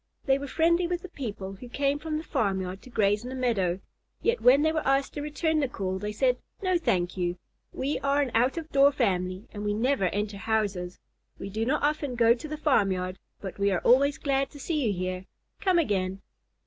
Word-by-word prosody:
They 270 -1 +3
were 280 - -5
friendly 340 +4 +2
with 355 +1 -3
the 370 - -8
people 205 - -6
who 245 +4 -10
came 280 +3 0
from 310 0 -3
the 310 - -4
farmyard 190 - -1
to - - -14
graze 205 -3 +2
in 250 - -6
the 260 - -5
meadow, 200 -8 0 0.4
yet 470 +1 +1
when 265 +4 +6
they 315 - +3
were 320 - 0
asked 270 0 +1
to 290 - -4
return 310 +2 0
the 280 - +1
call, 190 -6 -3
they 210 +2 -3
said, 250 +3 +1 0.2
"No, 370 -2 +2
thank 180 - 0
you. 175 -1 -1 0.3
We 280 +3 -2
are 280 +1 +1
an 275 -4 +1
out 250 +7 +2
of 320 -1 -5
door 280 +1 +6
family, 185 -7 -1
and 205 -1 -5
we 205 0 0
never 245 -1 +1
enter 205 +2 -2
houses. 200 -4 -1 0.4
We 195 - -7
do 220 +3 -1
not 295 +3 +1
often 290 -3 0
go 230 -1 +5
to 250 +6 -7
the 305 0 -5
farmyard, 190 -11 +1 0.2
but 195 -1 -7
we 200 0 +3
are 185 -3 0
always 280 +4 +4
glad 275 -1 0
to 290 - -13
see 295 -4 -1
you - - +2
here. 185 0 -3 0.3
Come 375 -3 +2
again." 195 - 0
245 Hz, 220 wpm, -27 LUFS, 195-290 Hz, 0.4 s, when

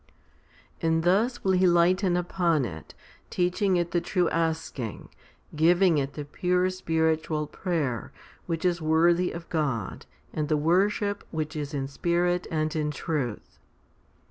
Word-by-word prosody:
2. - - -1
And 160 0 +2
thus 220 +8 +2
will 190 - +2
He 185 0 +4
lighten 175 +1 +3
upon 175 -5 +1
it, 80 -7 -9 0.3
teaching 180 +1 +1
it 175 0 -1
the 175 0 +1
true 180 -1 +1
asking, 160 -8 -2 0.5
giving 170 +1 +4
it 140 +1 -3
the 150 - -6
pure 180 +4 0
spiritual 160 -3 0
prayer, 150 - -3 0.4
which 165 +1 -2
is 175 -1 +1
worthy 170 +3 +3
of 170 -1 -8
God, 140 - -2 0.3
and 150 -1 -2
the 155 - +3
worship 200 +6 +1
which 155 -1 -4
is 145 -1 -4
in 135 -1 -2
spirit 175 +4 0
and' 155 -1 -1
in 150 -1 0
truth. 145 -7 -4
165 Hz, 145 wpm, -27 LUFS, 150-180 Hz, 0.5 s, He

